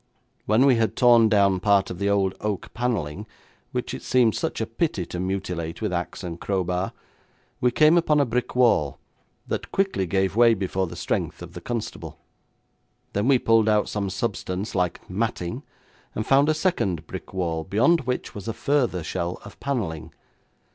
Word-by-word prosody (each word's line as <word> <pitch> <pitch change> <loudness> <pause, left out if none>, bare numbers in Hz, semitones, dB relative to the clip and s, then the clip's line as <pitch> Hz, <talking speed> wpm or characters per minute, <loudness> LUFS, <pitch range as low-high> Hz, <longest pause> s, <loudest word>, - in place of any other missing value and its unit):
When 110 +5 +4
we 130 -4 +5
had 115 -1 0
torn 120 -3 +6
down 100 -3 +3
part 100 0 +2
of 90 - -7
the 100 0 +1
old 100 -2 +2
oak 105 -2 -3
panelling, 105 -6 -2 0.4
which - - -3
it - - -6
seemed 125 -4 +3
such - - -2
a - - 0
pity - - -2
to 90 - -6
mutilate 90 -3 -3
with 105 -4 -2
axe 90 +3 -4
and 85 -2 -6
crowbar, 90 -1 -1 0.7
we 125 - +3
came 155 +7 +5
upon 150 -3 +2
a 140 - +4
brick 125 +1 -2
wall, 115 - +3 0.5
that - - -4
quickly 195 - 0
gave 95 +2 0
way 115 0 +6
before 95 -1 -1
the - - -8
strength - - -3
of 85 0 -10
the 90 - -8
constable. 120 -3 -5 1.0
Then 100 +4 0
we 135 -1 +6
pulled 115 -2 +3
out 105 -1 +3
some 100 -2 -2
substance 95 0 -3
like 90 -3 -1
matting, 110 +2 -2 0.5
and 110 - -2
found 140 +4 +4
a 155 - +3
second 100 - 0
brick - - -8
wall, 85 -4 -2
beyond 125 - +3
which 125 - -2
was 100 0 -8
a 115 - -1
further 125 - 0
shell 85 +1 -3
of - - -12
panelling. 85 - -3
100 Hz, 175 wpm, -24 LUFS, 90-120 Hz, 1.0 s, torn